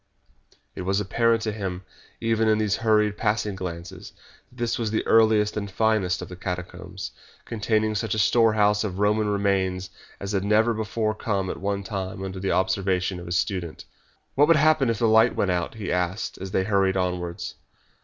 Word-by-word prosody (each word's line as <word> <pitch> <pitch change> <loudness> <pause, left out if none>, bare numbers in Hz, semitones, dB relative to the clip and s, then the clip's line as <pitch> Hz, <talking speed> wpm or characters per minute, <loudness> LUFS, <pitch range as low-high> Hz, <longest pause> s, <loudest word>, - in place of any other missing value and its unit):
It - - -6
was 95 +2 0
apparent 115 +3 +1
to 110 - -1
him, 95 -3 -5 0.4
even 115 -1 +1
in 110 0 +4
those 105 -2 +1
hurried, 105 -2 +2
passing 105 -1 0
glances, 90 +1 -7 0.4
that 125 - -21
this 120 -1 -1
was 115 -2 -1
the 110 - -1
earliest 110 -2 +4
and 100 -1 -3
finest 100 -3 +1
of - - -8
the 90 - -9
catacombs, 90 0 -6 0.3
containing 110 -1 0
such 110 +2 -1
a - - -3
storehouse 105 -1 +3
of 95 -4 -4
Roman 105 +1 +2
remains 95 -2 0 0.3
as 100 0 -4
had 95 -2 0
never 110 +3 +3
before 110 0 -1
come 100 -3 -2
at - - -6
one 100 +2 -2
time 95 -2 -5
under 95 0 -5
the 95 0 -1
observation 95 -1 0
of 85 - -9
the - - -6
student. 85 -1 -2 0.5
"What 145 +2 +4
would 165 -1 +5
happen 155 -4 +3
if 115 - 0
the 115 - +2
light 110 +2 +5
went 95 - +1
out?" 90 +3 -2
he 105 -3 -4
asked, 90 +4 -2
as 95 - -6
they 95 - +1
hurried 95 -2 +2
onwards. 90 -2 -3
100 Hz, 185 wpm, -25 LUFS, 95-110 Hz, 0.5 s, would